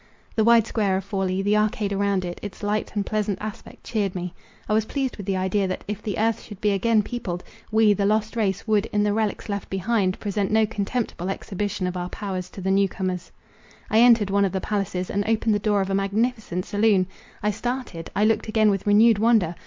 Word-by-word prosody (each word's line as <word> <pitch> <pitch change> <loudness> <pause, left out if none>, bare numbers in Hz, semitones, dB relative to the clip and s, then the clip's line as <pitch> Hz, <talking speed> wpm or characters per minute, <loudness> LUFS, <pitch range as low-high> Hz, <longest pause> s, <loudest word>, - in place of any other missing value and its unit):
The 220 - +3
wide 230 -1 +6
square 200 -5 0
of 190 - -3
Forli, 195 -1 -1
the 205 +1 +2
arcade 210 -1 +1
around 200 -2 0
it, 175 0 -5
its 205 0 -8
light 210 +1 -1
and 205 -1 0
pleasant 210 -2 -1
aspect 215 -1 -8
cheered 205 -5 -1
me. 180 0 -4 0.3
I 210 - 0
was 220 0 +2
pleased 270 +1 -2
with 200 -2 -8
the 195 -1 0
idea, 190 +1 +1
that, 185 - -4
if 210 0 -4
the 210 -2 -3
earth 225 0 +1
should 205 -4 -11
be 210 - +2
again 215 +2 +2
peopled, 195 -7 -4 0.3
we, 220 -1 +5
the 200 0 +1
lost 215 +1 0
race, 205 -2 -1
would, 215 0 +2
in 205 0 0
the 205 -1 +2
relics 215 -2 -1
left 200 -1 -4
behind, 190 0 0
present 200 -1 -1
no 220 0 +4
contemptible 210 -3 -3
exhibition 200 0 -3
of 180 0 -2
our 180 0 -3
powers 185 -3 -4
to 195 - -9
the 190 +1 0
new 195 0 +3
comers. 185 -1 -4 0.6
I 220 - +5
entered 230 -4 +5
one 200 0 +3
of 195 - 0
the 190 - 0
palaces, 185 -2 -2
and 205 0 0
opened 225 0 +2
the 205 - +1
door 205 -1 +1
of 195 0 -2
a - - 0
magnificent 200 -1 -1
saloon. 205 -2 +3 0.4
I 210 - +2
started—I 215 -5 -2
looked 225 0 +1
again 215 -1 +3
with 195 0 -2
renewed 215 +1 +5
wonder. 220 -7 +3
205 Hz, 220 wpm, -24 LUFS, 190-220 Hz, 0.6 s, wide